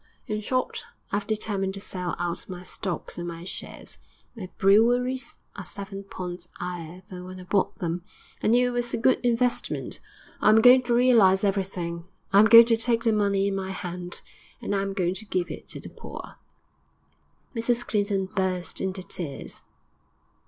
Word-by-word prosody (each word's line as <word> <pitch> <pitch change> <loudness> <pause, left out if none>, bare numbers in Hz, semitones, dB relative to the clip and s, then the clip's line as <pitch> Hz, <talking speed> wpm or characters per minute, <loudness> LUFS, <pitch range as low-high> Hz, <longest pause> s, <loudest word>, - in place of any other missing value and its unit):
In 215 -3 -3
short, 255 +4 -1 0.3
I 200 - +2
'ave 205 0 -5
determined 200 -3 -1
to - - -5
sell 180 -3 -4
out 175 +1 -3
my 180 -1 -7
stocks 180 -2 -4
and 175 - -4
my 170 0 -6
shares; 185 - -6 0.4
my 190 -5 -7
breweries 245 +6 +3 0.2
are - - -6
seven 195 0 -7
points 180 -2 -6
'igher 175 0 -6
than 180 -3 -8
when 185 0 -9
I - - -9
bought 190 +1 +1
them; 175 0 -3 0.4
I - - 0
knew 245 +3 +4
it - - -3
was 240 -1 0
a - - -1
good 250 +3 +3
investment. 245 0 0 0.4
I - - +5
am 215 - +7
going 250 +3 +8
to 240 -1 +2
realise 225 -6 +5
everything; 185 -4 -1 0.3
I 200 - +8
am 215 - +8
going 230 +1 +10
to 230 -1 +3
take 230 0 +1
the 225 -2 +3
money 200 -2 +2
in 200 - -1
my 190 -1 -3
hand, 180 -1 -5 0.4
and 205 - -2
I 195 - +1
am 195 0 -2
going 180 -2 0
to 220 +3 -5
give 185 -4 -1
it - - -9
to - - -6
the - - -8
poor.' - - -10 1.2
Mrs 235 +1 +1
Clinton 200 -2 0
burst 185 -1 -2
into 190 0 -2
tears. 150 -7 -4
195 Hz, 180 wpm, -26 LUFS, 180-230 Hz, 1.2 s, going